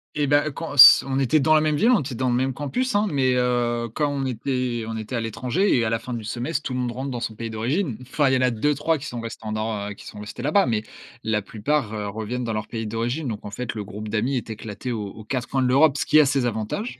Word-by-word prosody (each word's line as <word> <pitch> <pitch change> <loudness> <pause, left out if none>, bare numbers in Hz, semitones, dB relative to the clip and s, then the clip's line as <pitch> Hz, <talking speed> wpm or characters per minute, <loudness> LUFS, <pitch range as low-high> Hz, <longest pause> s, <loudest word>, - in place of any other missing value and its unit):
Et 145 -1 +1
bah 145 +2 +3
quand 165 +2 -6
s 135 - +10
on 135 0 0
était 145 +4 +3
dans 155 +3 +3
la 155 - +5
même 155 -1 +1
ville, 230 +11 +4
on 230 - +5
était 130 -3 -5
dans 130 +1 0
le - - +1
même 130 +1 0
campus, 230 - -2
hein, 210 +1 +3
mais, 130 -3 +2
heu, 120 -1 0
quand 150 -1 0
on 140 -1 -2
était 125 -1 -2
on 110 0 -4
était 110 +3 -5
à 115 - -1
l'étranger 125 - 0
et 115 - +1
à - - 0
la 115 0 0
fin 125 - -7
du 115 -2 -4
semestre, 125 +7 -3
tout 130 - -4
le 125 - -2
monde 125 -1 -1
rentre 130 +2 -5
dans 120 - -3
son 110 -2 -4
pays 115 0 -5
d'origine. 120 - -1
Enfin 135 +2 +1
il - - +2
y - - +4
en - - -1
a 125 - +4
2-3 150 +7 +1
qui 145 - -9
sont 120 -3 -5
resté 115 -1 -8
en 110 - -3
nor 110 -1 -3
heu, - - -5
qui - - -14
sont 105 - -9
restés 105 +3 -8
là-bas 150 +8 +3
mais 110 -3 0 0.4
la 110 -1 0
plupart, 110 +3 -2
heu, 105 -1 -3
reviennent 110 +4 -4
dans 115 -2 -2
leur 105 0 -3
pays 110 -2 -4
d'origine 120 +7 -2
donc 110 -3 -5
en 100 - -6
fait, 120 +2 -4
le 105 - -4
groupe 105 +2 -8
d'amis 120 +5 0
est 115 - -5
éclaté 110 +3 -6
aux 105 -3 -3
aux 105 +2 -10
quatre 125 +2 -3
coins 135 - 0
de 125 - +2
l'Europe, 140 +2 +4
ce - - -1
qui 155 - +5
a 150 - +6
ses 135 -2 +1
avantages 115 - -3
125 Hz, 295 wpm, -23 LUFS, 110-140 Hz, 0.4 s, s